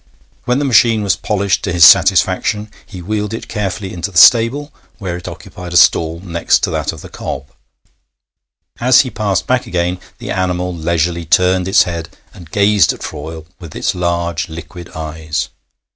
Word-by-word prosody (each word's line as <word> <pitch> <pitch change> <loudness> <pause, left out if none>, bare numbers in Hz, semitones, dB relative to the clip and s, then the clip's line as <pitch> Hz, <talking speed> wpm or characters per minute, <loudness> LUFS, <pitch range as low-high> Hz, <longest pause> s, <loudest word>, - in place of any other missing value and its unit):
When 125 +1 +1
the 145 - -1
machine 115 -4 +3
was 100 - +2
polished 100 -2 -1
to 100 - -2
his 85 -2 +6
satisfaction, 105 +5 +4 0.2
he 95 -4 -10
wheeled 105 +2 -3
it - - -8
carefully 105 -2 -4
into 90 +2 -4
the 90 - -6
stable, 120 - +5 0.2
where 90 -4 -4
it 90 +1 -8
occupied 90 0 -9
a - - +4
stall 80 -1 +3
next 85 -3 0
to - - 0
that - - -2
of - - -11
the - - -10
cob. 70 - -6 1.3
As 130 +2 +5
he 130 -2 -5
passed 100 -3 -1
back 125 0 0
again, 90 0 -1 0.2
the - - -7
animal 90 -1 -1
leisurely 85 +1 -1
turned 90 +3 +2
its 95 - +5
head 85 -2 -5 0.2
and 85 -4 -14
gazed 100 -3 +3
at - - -11
Froyle 80 +1 -7
with 85 -5 -11
its - - -1
large 85 -1 -2
liquid 85 +1 -10
eyes. 80 -1 -4
90 Hz, 175 wpm, -16 LUFS, 85-105 Hz, 1.3 s, his